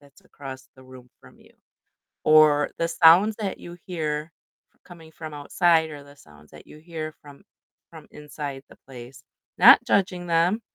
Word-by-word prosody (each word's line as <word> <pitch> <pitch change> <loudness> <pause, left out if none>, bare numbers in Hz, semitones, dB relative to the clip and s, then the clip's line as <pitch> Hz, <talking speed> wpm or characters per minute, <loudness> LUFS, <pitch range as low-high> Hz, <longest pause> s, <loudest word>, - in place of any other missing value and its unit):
that's 140 -1 -23
across 135 -2 -12
the 130 - -17
room 130 -1 -16
from - - -20
you, - - -23 0.7
or 155 -1 +4
the 165 - -1
sounds 175 +6 +4
that 205 -3 -5
you 175 0 -12
hear 155 -3 -5 0.5
coming 165 -3 -16
from 155 -1 -10
outside 160 +2 +1
or 145 -2 -10
the 145 0 -18
sounds 75 - -20
that 75 - -16
you - - -15
hear 160 -1 -8
from 145 -1 -16 0.5
from - - -14
inside 145 -2 -9
the - - -18
place. 125 0 -13 0.4
Not - - +7
judging 180 -3 -1
them, 170 +5 +1
155 Hz, 160 wpm, -23 LUFS, 140-170 Hz, 0.7 s, Not